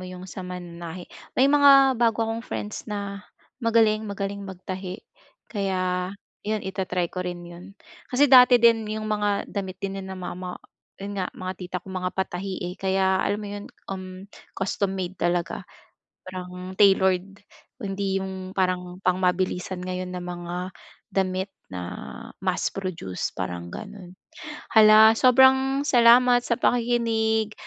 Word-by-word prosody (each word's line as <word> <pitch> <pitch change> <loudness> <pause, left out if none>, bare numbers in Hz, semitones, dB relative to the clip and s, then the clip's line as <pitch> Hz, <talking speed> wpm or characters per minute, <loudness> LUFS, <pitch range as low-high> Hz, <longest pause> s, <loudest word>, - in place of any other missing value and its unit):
yung 180 0 -9
sa 190 +1 -8
mananahi. 175 -1 -7 0.3
May 260 - +5
mga 275 -1 +7
bago 230 -1 +3
akong 225 +1 -3
friends 210 -2 -6
na 200 -1 -4 0.4
magaling 225 -2 +3
magaling 200 0 -4
magtahi. 185 0 -6 0.5
Kaya, 185 -3 -1 0.3
'yon 215 0 -3
ita-try 185 -2 -2
ko 185 - -3
rin 175 -1 -5
yun. 175 +3 -12 0.3
Kasi 270 +2 +3
dati 250 -1 +9
din 230 -2 +4
yung 215 0 -3
mga 210 -1 0
damit 190 -2 -5
din 195 0 -4
nina 190 0 -7
mama, 180 0 -6 0.4
yun 200 0 -5
nga, 185 - -1
mga 185 0 -4
tita 180 0 -5
ko, 190 - -9
mga 185 -1 -2
patahi 190 0 -3
eh - - -10
kaya 190 0 +2
alam 205 - -1
mo 205 - -6
yun 205 0 -6 0.3
um, 185 0 -8 0.3
custom-made 190 -1 -2
talaga. 175 0 -1 0.5
Parang 185 0 -8
tailored. 195 -1 +3 0.4
Hindi 195 -1 -2
yung 190 0 -6
parang 180 -1 -1
pang 185 -1 +2
mabilisan 180 0 -1
ngayon 185 0 -4
na 180 - -4
mga 175 +1 -5 0.4
damit 190 0 -1 0.2
na 90 -1 -7 0.6
mass-produced 170 - -3
parang 90 -2 -5
gano'n. 200 -4 -9 0.6
Hala, 220 0 +8
sobrang 265 +3 +5
salamat 245 -1 +6
sa 235 -1 -1
pakikinig. 230 -3 +1
190 Hz, 135 wpm, -25 LUFS, 180-215 Hz, 0.6 s, dati